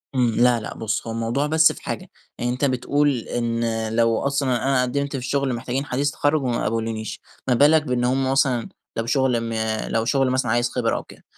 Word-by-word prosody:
إمم، 125 -2 +3
لا 120 -1 +4
لا، 110 - -7
بُصّ، 110 0 -3
هو - - -3
الموضوع 115 +6 -1
بس 160 +1 +5
في - - -11
حاجة، - - -5 0.3
يعني 120 0 -1
أنت 125 +3 0
بتقول 140 +2 +1
إن 115 -1 -2
لو 115 -1 +3
أصلًا 140 -3 0
أنا 135 -1 +2
قدّمت 140 +3 -1
في 135 - -3
شغل 140 -1 0
محتاجين 130 +3 -3
حديث 140 +1 -1
التخرج 145 0 +1
وما 120 -2 -1
قبلونيش، 110 0 -3 0.3
ما 130 - +3
بالك 150 +5 +5
بإن 125 -4 -1
هُم 130 +1 +1
مثلًا 135 -3 +1 0.3
لو 115 - -1
شغل 125 0 +2
م - - -3 0.4
لو 115 0 +1
شغل 135 +2 +2
مثلًا 130 -3 0
عايز 120 +1 +2
خبرة 120 -3 0
أو - - -5
كده، - - -16
125 Hz, 205 wpm, -23 LUFS, 115-140 Hz, 0.4 s, بس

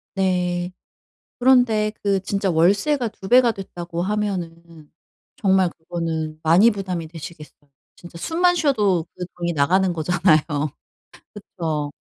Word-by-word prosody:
네. 180 -1 0 0.7
그런데 245 -4 +3
그 200 -1 +1
진짜 195 -1 -1
월세가 205 - +2
2 195 -2 -11
배가 245 -1 +6
됐다고 175 -4 -6
하면은 170 -6 -4 0.5
정말 190 -3 +3
그거는 160 -2 -5
많이 185 +9 +5
부담이 185 -5 -4
되시겠어요. 155 -3 -11 0.3
진짜 175 -1 -12
숨만 355 - +1
쉬어도 210 - +1
그 180 - -5
돈이 175 0 -2
나가는 180 +6 +2
거잖아요. 170 0 +3 0.9
그쵸. 160 -7 -4
180 Hz, 260 characters per minute, -22 LUFS, 165-205 Hz, 0.9 s, 배가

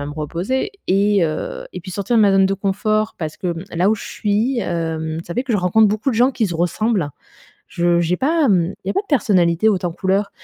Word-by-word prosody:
à 145 - -4
me 145 - -6
reposer 170 - -2 0.2
et 200 0 +3
heu, 155 -1 -4
et 180 - -6
puis 180 - -9
sortir 200 +5 -1
de - - +5
ma 205 - +5
zone 195 0 +4
de 195 - 0
confort 215 +2 -1
parce 155 -2 -5
que, 180 - -4
hem, 170 0 -4
là 180 +4 +3
où - - +3
je - - -9
suis, 220 +5 -1
hem, 160 -4 -3
ça 170 - -6
fait 250 - 0
que 265 -3 -3
je 210 - +2
rencontre 200 +4 +4
beaucoup 215 +6 0
de - - -2
gens 245 +4 +4
qui 230 -4 -1
se 175 - -5
ressemblent. 180 0 0 0.6
Je 175 0 +1
j'ai 175 +1 0
pas, 315 +3 +2
hem, 185 -7 +2
il - - -5
y - - +1
a - - 0
pas - - +1
de 410 - -14
personnalités 195 - +2
hautes 190 -3 -1
en 175 - -1
couleur. 195 +3 0
195 Hz, 260 wpm, -19 LUFS, 170-215 Hz, 0.6 s, de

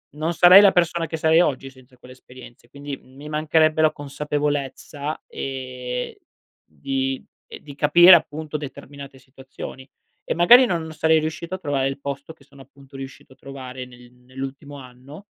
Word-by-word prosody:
non 160 +3 -2
sarei 180 +3 +8
la 200 -2 +6
persona 170 -1 0
che 160 - -5
sarei 160 +1 +4
oggi 135 -5 -1
senza 130 -1 -21
quelle 125 +1 -15
esperienze, 125 -2 -16
quindi, 140 +1 -7
mhmm, 130 - -22
mi 145 +2 -11
mancherebbe 155 +1 +1
la 155 -1 +4
consapevolezza, 145 0 -4
ehm, 130 -2 -6 0.5
di 135 - -4 0.2
ehm, - - -11
di 145 -2 -12
capire 175 +5 +7
appunto 155 -1 -3
determinate 140 -1 -10
situazioni. 130 0 -11 0.4
E - - 0
magari 235 +10 +7
non 175 -8 -1
non 160 - -8
sarei 160 +1 +2
riuscito 160 +3 -5
a - - -6
trovare 140 -5 -1
il 135 +1 -5
posto 140 +2 -7
che 160 - -24
sono 140 0 -18
appunto 135 0 -16
riuscito 135 -1 -11
a - - -25
trovare 130 -2 -9
nel 125 -1 -17
nell'ultimo 135 +3 -9
anno 130 +6 -13
140 Hz, 170 wpm, -22 LUFS, 130-155 Hz, 0.5 s, sarei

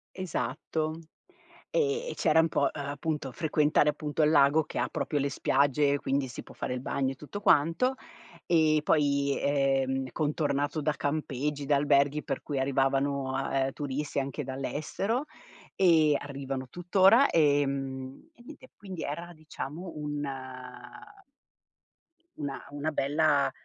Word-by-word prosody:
Esatto. 160 -3 -2 0.8
Ehm, 470 0 0
e - - -4
c'era 160 - +3
un 160 - +4
po', - - 0
uhm, 145 -2 -5
appunto 145 -1 -3
frequentare 150 -1 +2
appunto 150 +1 -2
il 150 - +4
lago 145 +1 +5
che - - -4
proprio 150 - -1
le 140 0 0
spiagge, 140 +1 +2
quindi 135 0 -1
si 120 - -7
può - - -14
fare - - -3
il 125 - -3
bagno 135 0 -1
e - - -7
tutto 155 +9 -8
quanto. 165 - +3 0.5
E 155 -3 +4
poi, 140 -2 +2
ehm, 135 -2 +1
contornato 145 -1 0
da 155 +1 +1
campeggi, 145 -1 -2
da 145 +1 +3
alberghi 140 +1 +2
per 135 - -3
cui 140 -3 -3
arrivavano, 135 0 0
ehm, 135 0 +1
turisti 145 0 -3
anche 140 +2 -3
dall'estero 155 - -2 0.5
e 160 -5 +5
arrivano 135 -2 -5
tutt'ora, 190 - +5
ehm, 135 - 0
e 240 - -20
niente. 260 -1 -13
Quindi 190 -4 -7
era 170 +4 -5
diciamo 155 +2 -7
un 150 -1 -3 2.1
una 145 -2 -5
una 145 +2 -2
bella, 145 0 +2
145 Hz, 135 wpm, -29 LUFS, 140-160 Hz, 2.1 s, lago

